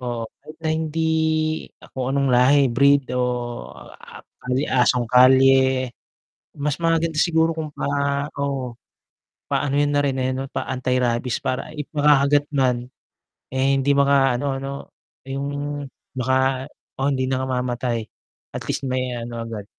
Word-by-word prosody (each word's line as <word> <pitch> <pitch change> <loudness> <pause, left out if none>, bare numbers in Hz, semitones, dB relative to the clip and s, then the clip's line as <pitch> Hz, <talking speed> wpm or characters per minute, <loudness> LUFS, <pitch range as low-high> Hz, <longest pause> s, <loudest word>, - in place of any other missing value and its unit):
oo, 120 -2 -3 0.2
kahit 155 +1 -13
na 160 - -1
hindi 160 0 -2 0.9
kung 130 +1 -2
anong 140 -1 +1
lahi, 125 +4 +5
breed, 140 +1 +4
o, 125 -1 -2 0.2
a - - -13 0.6
asong 125 -1 +2
kalye, 130 0 +5 0.6
mas 150 +1 -2
maganda 165 0 +1
siguro 165 0 +3
kung 160 -1 -4
pa - - -3 0.5
oo, 135 -3 -2 0.8
paano 140 -1 0
'yun 145 0 +2
na 145 - +3
rin, 140 -2 0
eh, 130 0 0
'no, 135 +1 -5
pa-antirabies 125 -1 -1
para 130 - -2
i 150 - -4
makakagat 145 -1 +4
man, 125 -3 0 0.7
eh, 130 0 +1
hindi 135 +1 +2
maka-ano 140 -1 +2
'no, 135 0 -5 0.6
'yung 140 +1 -3 0.7
baka 130 +1 +1 0.3
oh, 135 - +1
hindi 130 -1 -1
nakamamatay, 125 -2 -1 0.5
at - - -4
least - - -2
may 130 -1 -1
ano 115 -1 -5
agad. 110 -3 -6
130 Hz, 130 wpm, -22 LUFS, 125-140 Hz, 0.9 s, lahi